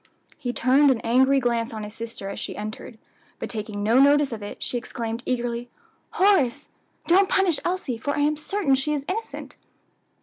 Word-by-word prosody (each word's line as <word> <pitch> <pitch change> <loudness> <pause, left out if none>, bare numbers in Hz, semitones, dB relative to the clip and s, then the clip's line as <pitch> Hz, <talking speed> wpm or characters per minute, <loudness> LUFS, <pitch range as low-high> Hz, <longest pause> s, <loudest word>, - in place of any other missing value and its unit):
He 255 -5 -4
turned 265 +4 +4
an 255 -4 +2
angry 265 +4 +3
glance 235 -2 0
on 220 -1 -6
his 210 0 -8
sister 225 -3 -7
as 200 - -6
she - - -5
entered; 215 +2 -7 0.4
but - - -5
taking 210 -2 -4
no 230 +5 +4
notice 285 0 +5
of 225 -2 -5
it, 205 - -7
she - - -3
exclaimed 230 -1 -4
eagerly, 240 -1 -2 0.4
"Horace, 290 -9 +2 0.4
don't 380 +3 +4
punish 365 -6 +2
Elsie, 345 -10 -2
for 285 +5 -2
I - - +1
am 300 +1 +2
certain 310 0 0
she 270 +3 +1
is 280 -1 -4
innocent." 445 +5 -5
255 Hz, 180 wpm, -24 LUFS, 230-295 Hz, 0.4 s, notice